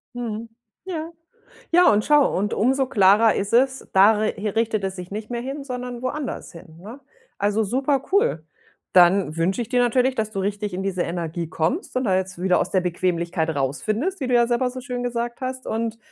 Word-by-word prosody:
Mhm. 230 Hz, -1 st, -5 dB, 0.4 s
Ja. 330 Hz, -3 st, -5 dB, 0.6 s
Ja 355 Hz, -4 st, +6 dB
und 210 Hz, 0 st, +1 dB
schau, 295 Hz, -9 st, +4 dB
und 205 Hz, +2 st, -1 dB
umso 265 Hz, +4 st, +2 dB
klarer 210 Hz, +1 st, +5 dB
ist 205 Hz, +3 st, -3 dB
es, 265 Hz, +2 st, +2 dB
da 195 Hz, +3 st, +7 dB
re 215 Hz, 0 st, 0 dB, 0.2 s
richtet 225 Hz, -3 st, 0 dB
es 190 Hz, 0 st, -2 dB
sich 180 Hz, -1 st, -8 dB
nicht 215 Hz, +3 st, -6 dB
mehr 235 Hz, 0 st, -2 dB
hin, 275 Hz, +2 st, -5 dB
sondern 250 Hz, -2 st, -6 dB
woanders 270 Hz, 0 st, -4 dB
hin, 165 Hz, -2 st, -14 dB
ne? 225 Hz, +9 st, -10 dB, 0.4 s
Also, 205 Hz, +2 st, +1 dB
super 265 Hz, +5 st, 0 dB
cool. 165 Hz, -, +2 dB, 0.5 s
Dann 175 Hz, -2 st, +4 dB
wünsche 190 Hz, +8 st, 0 dB
ich 230 Hz, -, -5 dB
dir 250 Hz, -1 st, +2 dB
natürlich, 250 Hz, +2 st, +2 dB
dass 215 Hz, -1 st, -2 dB
du 195 Hz, -, -4 dB
richtig 205 Hz, 0 st, -3 dB
in 190 Hz, +1 st, -3 dB
diese 185 Hz, -3 st, -1 dB
Energie 170 Hz, -1 st, -4 dB
kommst 165 Hz, -, -2 dB
und 255 Hz, -, +1 dB
da 190 Hz, -6 st, +2 dB
jetzt 185 Hz, -1 st, -3 dB
wieder 185 Hz, -1 st, +3 dB
aus -, -, -1 dB
der 185 Hz, -, +2 dB
Bequemlichkeit 170 Hz, -1 st, -1 dB
rausfindest, 215 Hz, -, -1 dB
wie 260 Hz, -, -2 dB
du 250 Hz, -, -1 dB
ja 240 Hz, 0 st, +5 dB
selber 245 Hz, +1 st, +1 dB
so 255 Hz, 0 st, -7 dB
schön 250 Hz, -2 st, -4 dB
gesagt 235 Hz, 0 st, -3 dB
hast 260 Hz, 0 st, -4 dB
und 225 Hz, 0 st, -2 dB
220 Hz, 200 wpm, -23 LUFS, 190-255 Hz, 0.6 s, da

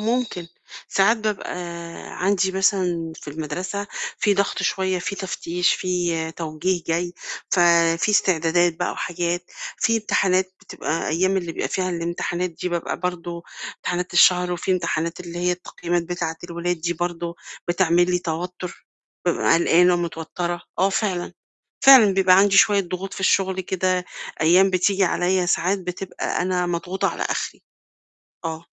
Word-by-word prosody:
ممكن، 225 Hz, -5 st, -1 dB, 0.4 s
ساعات 200 Hz, +4 st, +3 dB
بابقى 215 Hz, -2 st, -3 dB, 0.7 s
عندي 190 Hz, -1 st, +2 dB
مثلًا 180 Hz, -4 st, +1 dB
في -, -, -10 dB
المَدرسة 180 Hz, +7 st, -4 dB, 0.3 s
في 205 Hz, -, +3 dB
ضَغْط 200 Hz, 0 st, 0 dB
شوية، 190 Hz, -1 st, 0 dB
في 200 Hz, +3 st, -3 dB
تفتيش 180 Hz, -2 st, 0 dB
في 175 Hz, -3 st, -1 dB
توجيه 165 Hz, +2 st, -2 dB
جاي، 175 Hz, +1 st, -1 dB, 0.4 s
ففي 170 Hz, +1 st, +4 dB
استعدادات 175 Hz, -3 st, +3 dB
بقى -, -, -1 dB
وحاجات، 175 Hz, 0 st, -2 dB, 0.3 s
في 230 Hz, -, +2 dB
امتحانات 190 Hz, -3 st, +1 dB
بتبقى 165 Hz, -, -3 dB
أيام 185 Hz, +5 st, +1 dB
اللي 175 Hz, -3 st, -2 dB
بيبقى -, -, -3 dB
فيها 185 Hz, -1 st, -1 dB
الامتحانات 175 Hz, +1 st, -2 dB
دي 170 Hz, +2 st, -5 dB
بابقى 170 Hz, -1 st, -3 dB
برضه 175 Hz, -1 st, -4 dB, 0.3 s
امتحانات 180 Hz, 0 st, -3 dB
الشهر 180 Hz, 0 st, +5 dB
وفي 175 Hz, +2 st, -1 dB
امتحانات 170 Hz, -2 st, -1 dB
اللي 175 Hz, -1 st, -7 dB
هي 180 Hz, 0 st, +1 dB
التقييمات 175 Hz, -1 st, -3 dB
بتاعة 170 Hz, -1 st, -3 dB
الولاد 175 Hz, 0 st, -3 dB
دي 170 Hz, +2 st, -1 dB
برضه، 175 Hz, 0 st, -3 dB, 0.3 s
بتعمل 175 Hz, 0 st, +3 dB
لي 180 Hz, -, +2 dB
توتُّر، 180 Hz, +2 st, -5 dB, 0.4 s
بابقى 175 Hz, -1 st, +2 dB
قلقانة 175 Hz, +1 st, +4 dB
ومتوتَّرة، 175 Hz, 0 st, -3 dB, 0.2 s
آه 190 Hz, -, +4 dB
فعلًا، 195 Hz, -3 st, -1 dB, 0.5 s
فعلًا 255 Hz, -7 st, +9 dB
بيبقى 185 Hz, -1 st, +5 dB
عندي 195 Hz, 0 st, +4 dB
شوية 200 Hz, 0 st, +6 dB
ضغوط 185 Hz, +1 st, -5 dB
في -, -, -7 dB
الشُغل 190 Hz, 0 st, +2 dB
كده، 185 Hz, 0 st, 0 dB, 0.4 s
أيام 180 Hz, +5 st, +5 dB
بتيجي 190 Hz, +1 st, +2 dB
عليَّ 180 Hz, +1 st, +1 dB
ساعات 180 Hz, +3 st, +1 dB
بتبقى 180 Hz, 0 st, -3 dB
أنا 180 Hz, -1 st, 0 dB
مضغوطة 175 Hz, +2 st, -1 dB
على -, -, -4 dB
أخري. -, -, -3 dB, 0.8 s
آه. 160 Hz, -1 st, -3 dB
180 Hz, 140 wpm, -23 LUFS, 170-190 Hz, 0.8 s, فعلًا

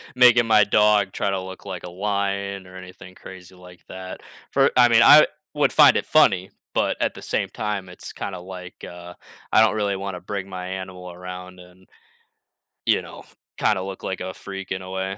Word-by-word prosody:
making 125 Hz, -1 st, +6 dB
my 110 Hz, -2 st, +6 dB
dog 105 Hz, -1 st, +3 dB
try 100 Hz, -, -2 dB
to 95 Hz, -1 st, -2 dB
look 95 Hz, +1 st, -10 dB
like 95 Hz, -3 st, -6 dB
a -, -, -7 dB
lion, 100 Hz, 0 st, -3 dB
or 90 Hz, -, -14 dB
anything 90 Hz, 0 st, -12 dB
crazy 95 Hz, -1 st, -13 dB
like 90 Hz, -1 st, -15 dB
that. 95 Hz, 0 st, -8 dB, 0.3 s
For -, -, +3 dB
I 120 Hz, -1 st, +7 dB
mean, 115 Hz, 0 st, +5 dB
I 150 Hz, +5 st, +8 dB, 0.3 s
would 150 Hz, -1 st, +2 dB
find 150 Hz, -2 st, +7 dB
it -, -, -2 dB
funny, 100 Hz, -12 st, +3 dB, 0.2 s
but -, -, 0 dB
at -, -, 0 dB
the -, -, -11 dB
same -, -, -2 dB
time, 105 Hz, -3 st, -4 dB
it's 90 Hz, -, -10 dB
kinda 95 Hz, -2 st, -6 dB
like, 90 Hz, 0 st, -10 dB
uh, 90 Hz, 0 st, -11 dB, 0.4 s
I -, -, +6 dB
don't 110 Hz, -1 st, +3 dB
really 100 Hz, -2 st, 0 dB
wanna 95 Hz, -2 st, -6 dB
bring 100 Hz, 0 st, -5 dB
my 90 Hz, -1 st, -6 dB
animal 95 Hz, -1 st, -7 dB
around, 90 Hz, +1 st, -9 dB
and 90 Hz, +1 st, -17 dB, 1.0 s
you -, -, +3 dB
know, -, -, -12 dB, 0.3 s
kinda 105 Hz, -3 st, +1 dB
look 95 Hz, 0 st, -7 dB
like 95 Hz, -, -4 dB
a 95 Hz, 0 st, -5 dB
freak, 95 Hz, 0 st, -8 dB
in 95 Hz, -, -2 dB
a 95 Hz, -, -9 dB
way. 95 Hz, +1 st, -4 dB
95 Hz, 200 wpm, -23 LUFS, 90-100 Hz, 1.0 s, I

